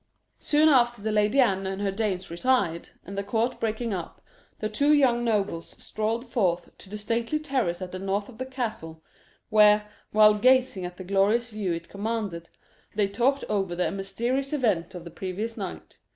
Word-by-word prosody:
Soon 305 +1 +3
afterwards 240 -6 +3
the 220 - +1
Lady 210 +5 +2
Anne 195 -6 +3
and 190 0 -4
her 200 -1 0
dames 195 -3 -2
retired, 170 -3 0 0.2
and 195 - -8
the 200 - -2
court 225 +4 -1
breaking 225 0 -2
up, 175 -3 -6 0.4
the 215 - -2
two 285 +8 +2
young 250 -5 +3
nobles 205 -7 -1
strolled 225 +3 -3
forth 185 -8 -1
to 190 - -13
the 210 - -5
stately 230 +6 -1
terrace 255 - -1
at 180 - -7
the 185 - -6
north 195 +1 -2
of 235 -4 -14
the 260 - -3
castle, 215 -12 -5 0.5
where, 210 -1 +5 0.2
while 215 0 +7
gazing 250 -3 +3
at 180 0 -12
the 185 - -7
glorious 200 +5 +1
view 210 -4 -2
it 170 0 -4
commanded, 200 -5 -4 0.5
they 205 -1 +2
talked 245 +8 +1
over 195 -4 -1
the 180 - 0
mysterious 235 +9 -2
event 195 - 0
of 175 - -7
the 170 - -10
previous 200 +7 -4
night. - - -7
210 Hz, 180 wpm, -26 LUFS, 190-240 Hz, 0.5 s, while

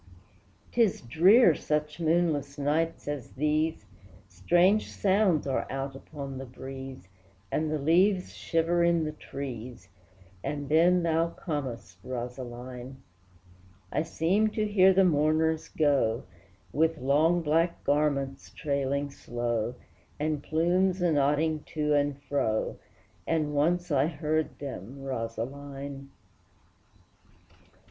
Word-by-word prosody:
'Tis 230 -5 +2
drear 175 - +6
such 150 +1 -2
moonless 160 -4 +1
nights 155 +4 -1
as 145 -4 -5
these, 155 +3 0 0.4
Strange 175 - +2
sounds 190 -4 +2
are 135 -2 -1
out 135 0 -4
upon 135 -1 -7
the 135 - -6
breeze, 130 -3 -9 0.4
And 155 0 0
the 155 - 0
leaves 180 +6 +2
shiver 170 +1 +1
in 170 -1 +3
the 155 - -2
trees, 125 -8 -8 0.5
And 145 -1 -4
then 175 +3 +4
thou 165 0 +2
comest, 135 - -5
Rosaline! 125 +1 -6 1.0
I - - +1
seem 180 +7 +1
to 215 0 -1
hear 190 -2 +5
the 190 +1 +4
mourners 155 0 +2
go, 140 -7 +1 0.5
With 160 +2 +2
long 155 +6 +2
black 165 +3 +1
garments 140 -2 0
trailing 140 -1 -2
slow, 120 -2 -3 0.4
And 150 -1 -1
plumes 180 +5 +1
anodding 155 -1 +2
to 150 -1 +1
and 145 -1 +1
fro, 110 -7 -1 0.5
As 160 -1 +2
once 160 +4 0
I 140 0 +3
heard 155 0 -1
them, 135 -1 -7
Rosaline! 135 +3 -5
150 Hz, 110 wpm, -28 LUFS, 135-165 Hz, 1.0 s, drear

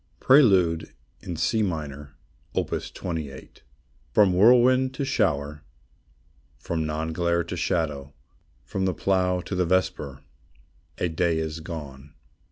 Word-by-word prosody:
Prelude 95 - +4 0.3
in 90 -3 -5
C 110 +7 +1
Minor, 75 -6 -4 0.4
Opus - - -2
28. 80 -6 -7 0.5
From 95 +6 +4
whirlwind 125 +6 +5
to 140 - -2
shower, 75 - 0 1.0
From 80 -2 -3
noon 80 +1 -3
glare 85 0 +1
to - - -6
shadow, 75 -5 -2 0.5
From 95 +7 -3
the 95 -3 0
plough 90 -2 +1
to 100 - -7
the 90 -1 +1
vesper, 75 -6 -1 0.7
A - - 0
day 85 0 0
is 80 0 -3
gone. 75 -4 -9
85 Hz, 120 wpm, -25 LUFS, 75-95 Hz, 1.0 s, whirlwind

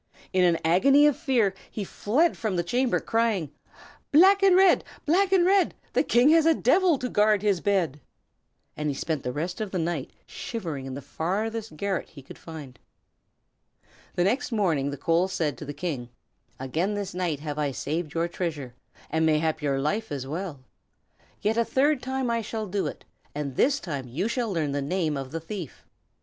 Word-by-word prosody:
In 185 -1 +4
an 170 -2 +4
agony 275 - +5
of 295 -3 +4
fear 255 - +1 0.2
he 210 - -4
fled 270 - +1
from 215 -4 -2
the 175 - 0
chamber, 245 +8 +1
crying, 225 -10 0 0.6
"Black 385 +6 +6
and 390 -2 +6
red! 375 -1 +5 0.2
black 375 +5 +3
and 370 -2 +4
red! 385 0 +3 0.2
The - - +3
King 245 +4 +4
has 325 0 +5
a 325 - +5
devil 335 +5 +3
to 255 - -3
guard 210 -3 +2
his 200 -5 +2
bed." 175 -8 0 0.7
And 150 0 -2
he 140 - -2
spent 155 0 -2
the 125 - -3
rest 170 +9 -4
of 215 - -2
the 185 - -3
night 165 -5 -2 0.2
shivering 165 - -5
in 130 - -5
the 140 - -7
farthest 210 - -3
garret 195 +1 -2
he 140 -4 -13
could 135 - -12
find. 145 -7 -10 1.4
The 175 - +2
next 240 +8 0
morning 165 -11 +1
the 145 - -5
coal 165 +6 +2
said 165 -7 -1
to - - -7
the 145 - -5
King: 145 -5 -4 0.5
"Again 160 +10 -1
this 200 -2 -4
night 175 -5 -2
have 150 -1 -4
I 145 -1 +1
saved 155 +4 -4
your 165 +1 +1
treasure, 155 -8 -4 0.4
and 160 0 +1
mayhap 160 0 +1
your 140 -2 0
life 210 +11 -1
as 135 -2 -3
well. 155 -1 -5 0.8
Yet 220 +2 +1
a 235 - +4
third 275 +3 +2
time 260 -1 -2
I 230 0 0
shall 220 0 -4
do 195 -3 -2
it, - - -8 0.3
and 140 -3 -4
this 280 - +3
time 140 -7 -5
you 160 - -2
shall 235 -2 -1
learn 155 -6 -1
the 140 0 -1
name 155 +1 -1
of 135 -1 -5
the 165 - -4
thief. 170 -3 -7
180 Hz, 190 wpm, -26 LUFS, 150-230 Hz, 1.4 s, Black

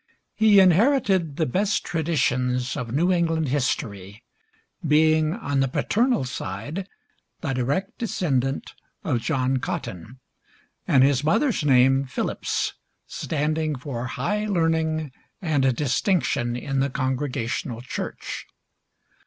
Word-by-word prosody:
He 215 -2 +5
inherited 190 - +3
the 160 - +2
best 195 - 0
traditions 125 -6 0
of 120 -2 -4
New 170 +8 +2
England 165 -4 +1
history, 105 -6 -2 0.6
being 155 +1 +3
on 145 -11 -2
the 135 - +3
paternal 235 - +1
side 125 - -5 0.5
the 135 -4 -2
direct 140 +10 -2
descendant 140 - -1 0.3
of 120 - 0
John 130 -1 0
Cotton, 115 0 -5 0.7
and 130 -2 +5
his 140 0 +3
mother's 190 - +2
name, 135 0 +4
Phillips, - - -2 0.3
standing 155 0 -1
for 125 -2 -5
high 210 - -2
learning 160 -5 0 0.3
and 140 -7 +1
distinction 135 - 0
in 135 +2 -2
the 135 +1 +1
Congregational 130 -3 -2
church. 125 - -6
145 Hz, 110 wpm, -24 LUFS, 125-165 Hz, 0.7 s, He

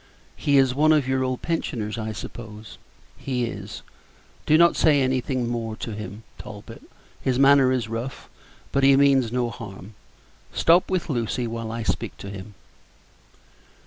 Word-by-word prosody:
"He 145 -1 +2
is 135 -2 +4
one 155 +4 +4
of 145 -4 +2
your 130 0 +1
old 130 -1 -2
pensioners, 115 -10 -2
I 110 -1 -4
suppose?" 110 0 -9 0.4
"He 125 -3 -1
is; 100 -3 -7 0.6
do 155 - +6
not 170 +1 +5
say 150 -3 +4
anything 130 -1 0
more 115 -2 -3
to 110 - -6
him, 105 +1 -7 0.2
Talbot. - - -10 0.4
His 130 -2 0
manner 135 -1 +6
is 125 -4 0
rough, 115 +4 -5 0.4
but 140 - +1
he 135 0 +7
means 135 -4 +4
no 120 -1 0
harm. 105 -3 -10 0.6
Stop 170 +2 +4
with 185 -2 -1
Lucy 120 -3 -1
while 115 -1 -4
I 115 0 -4
speak - - -2
to 100 - -8
him." 100 +1 -9
125 Hz, 155 wpm, -24 LUFS, 110-135 Hz, 0.6 s, he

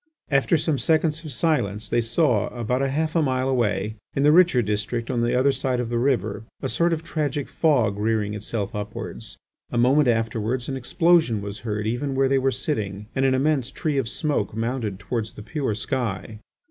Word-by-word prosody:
After 140 +4 +3
some 150 -2 0
seconds 160 0 +1
of 155 - -6
silence 110 - 0
they 120 - +1
saw 115 - +2
about 125 +2 -2
half 155 +4 0
a 165 - +4
mile 130 -3 0
away, 110 -4 0 0.2
in 140 - +1
the 150 - +6
richer 170 -7 +5
district 110 +3 -2
on 120 -2 0
the 120 +1 +1
other 135 +2 +4
side 130 -2 -1
of 120 -2 -2
the 120 0 0
river, 120 -5 0 0.2
a - - -2
sort 170 +4 +2
of 165 -1 -1
tragic 150 -3 -2
fog 120 -11 +2
rearing 105 -1 0
itself 105 0 -4
upwards. 105 -1 -6 0.3
A - - -2
moment 130 +4 +4
afterwards 115 +1 0
an 135 - -3
explosion 160 - +3
was 100 +1 -6
heard 105 -2 -3
even 135 +5 -1
where 135 0 +3
they 135 0 +3
were 135 +1 +2
sitting, 105 -7 -3
and 135 0 +2
an 130 -1 +3
immense 135 -2 +1
tree 150 -3 -1
of 115 -4 -2
smoke 130 -7 -1
mounted 115 -3 -2
towards 110 +2 -4
the 105 - -10
pure 135 -5 -2
sky. 110 -3 -3
125 Hz, 195 wpm, -24 LUFS, 110-145 Hz, 0.3 s, the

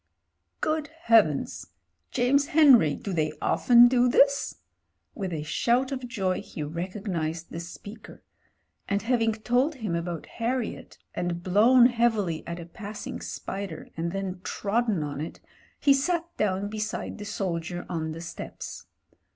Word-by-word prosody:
"Good 310 -1 0
Heavens! 230 - +2 0.4
James 275 +3 +2
Henry, 265 - +6
do 200 - -5
they 155 -2 0
often 240 -1 +6
do 250 0 +3
this?" 280 +3 +3 0.6
With 195 -4 -4
a 155 -3 -3
shout 245 - +1
of 260 -2 -4
joy 190 -6 -1
he 155 - -7
recognised 170 0 -4
the 165 - -5
speaker. 205 +5 -10 0.7
And 200 +1 0
having 230 -1 +2
told 245 +7 +1
him 220 -9 -3
about 170 -1 -3
Harriet, 240 0 -3 0.2
and 175 -1 -3
Mown 230 +7 +6
heavily 225 -9 +1
at 170 +1 -5
a 170 - -7
passing 205 +5 -7
spider 195 -5 -6
and 170 +1 -2
then 190 -1 -4
trodden 210 -4 0
on 145 -1 -4
it, 160 - -6 0.4
he 280 - +5
sat 330 +5 0
down 200 -1 0
beside 215 +1 -4
the 205 - -6
soldier 175 -3 -3
on 160 -2 -3
the 165 +1 -7
steps. 170 0 -8
205 Hz, 140 wpm, -27 LUFS, 170-245 Hz, 0.7 s, Henry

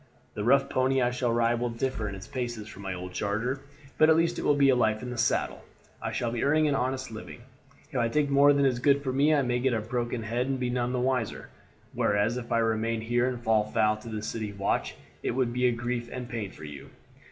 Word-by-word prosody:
The 105 - -4
rough 135 +4 +4
pony 130 +1 +1
I 120 -1 +2
shall 125 -1 0
ride 115 0 +2
will 120 0 -1
differ 115 -2 -2
in 100 - -6
his 95 - -10
paces 120 -4 -4
from 100 - -11
my 95 -1 -4
old 90 0 -7
charger, 115 +8 -1 0.4
but 155 - +6
at 160 - +7
least 165 +1 +1
it - - -2
will 145 - +3
be 140 -2 +5
life 110 -2 +1
in 125 - -5
the - - -4
saddle. 115 - 0 0.4
I - - -3
shall 120 -1 -1
be 120 - -2
earning 155 +2 +3
an 145 - +2
honest 130 -1 -1
living; 110 +2 -9 0.5
if 135 - -1
I 120 - +2
take 150 +4 +1
more 140 +1 +6
than 140 -1 +3
is 125 -3 +2
good 140 +2 +3
for 130 -2 -2
me 145 +3 +3
I 145 -3 +3
may 125 -1 0
get 130 0 +1
a - - 0
broken 120 +1 -3
head 120 +3 -1
and 135 -1 -1
none 125 -1 -1
be - - -3
the 125 - 0
wiser, 130 -4 -1 0.4
whereas 105 +3 +1
if 120 -1 -7
I 115 - +3
remain 115 0 0
here 120 +2 +1
and 125 -2 -4
fall 110 -2 +3
foul 110 0 +2
of 115 +1 -9
the 105 -1 -4
city 110 -2 -3
watch 100 0 -1 0.3
it - - -2
would 125 -2 0
be 125 0 +3
grief 120 0 -3
and 125 -1 -5
pain 115 -5 -4
for 95 - -13
you." 75 -2 -9
120 Hz, 250 wpm, -28 LUFS, 110-130 Hz, 0.5 s, at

